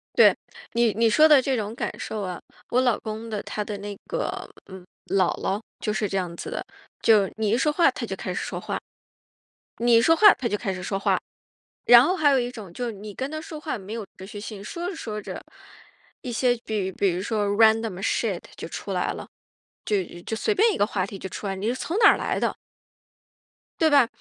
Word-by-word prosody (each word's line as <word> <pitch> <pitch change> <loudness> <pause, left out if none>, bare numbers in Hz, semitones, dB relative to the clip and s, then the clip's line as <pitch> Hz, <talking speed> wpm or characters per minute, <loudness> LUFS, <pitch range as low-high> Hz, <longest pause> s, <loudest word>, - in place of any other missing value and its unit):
对， - - +7 0.4
你 235 -1 +3
你 230 +1 +3
说 305 +8 +6
的 295 -3 +7
这 265 0 0
种 215 -1 -3
感 - - -3
受 215 -1 -4
啊， 180 -2 -5 0.3
我 250 - +3
老 245 -4 +2
公 220 +1 -6
的 210 -2 -3
他 210 - -3
的 205 -1 -5
那 205 0 -6
个， - - -2 0.4
嗯， 190 -2 -11 0.2
姥 185 -3 +2
姥， 200 +3 -1 0.2
就 210 - -1
是 210 -2 -1
这 195 - -1
样 175 -2 -3
子 - - -7
的， - - -4 0.4
就 210 -4 +5
你 215 -2 0
一 230 - +3
说 300 +4 +2
话， 335 +3 +4
她 - - -5
就 - - -5
开 - - -4
始 - - -3
说 - - -4
话。 - - -3 1.0
你 240 0 +3
一 230 - +6
说 325 +7 +5
话 415 +3 +8
她 250 - -3
就 210 - -1
开 195 -3 -2
始 185 - -6
说 195 +1 -2
话， - - +2 0.7
然 240 0 +9
后 360 +8 +1
还 295 -4 +4
有 270 - +4
一 245 -1 -1
种 210 -8 -10
就 245 +6 -4
是 230 - -3
你 205 +1 -9
跟 265 +6 -4
她 310 - -4
说 315 -1 -8
话 305 - -3
没 200 0 -9
有 225 -3 -5
持 190 - -10
续 205 +1 -8
性， 210 -1 -7
说 345 +10 -4
着 370 - -5
说 215 -8 -5
着， - - -7 0.8
一 250 - -5
些 245 +1 +2
比 205 -4 -2
比 195 0 +1
如 175 - -2
说 210 +1 -1
random 220 -2 +3
shit 200 - 0 0.2
就 - - -6
出 - - -6
来 - - 0
了， - - -8 0.6
就 205 -2 +1 0.2
就 220 +5 -4
随 430 - +1
便 440 +3 +4
一 - - -3
个 205 - +3
话 190 -4 -1
题 195 0 -8
就 190 - -5
出 190 - -7
来 195 - -1
了， - - -8
你 210 - -2
是 245 - 0
从 335 +8 -3
哪 430 - +8
儿 - - +1
来 - - -1
的 - - 0 1.3
对 320 - +5
吧， 280 -5 +5
220 Hz, 275 characters per minute, -25 LUFS, 200-255 Hz, 1.3 s, 然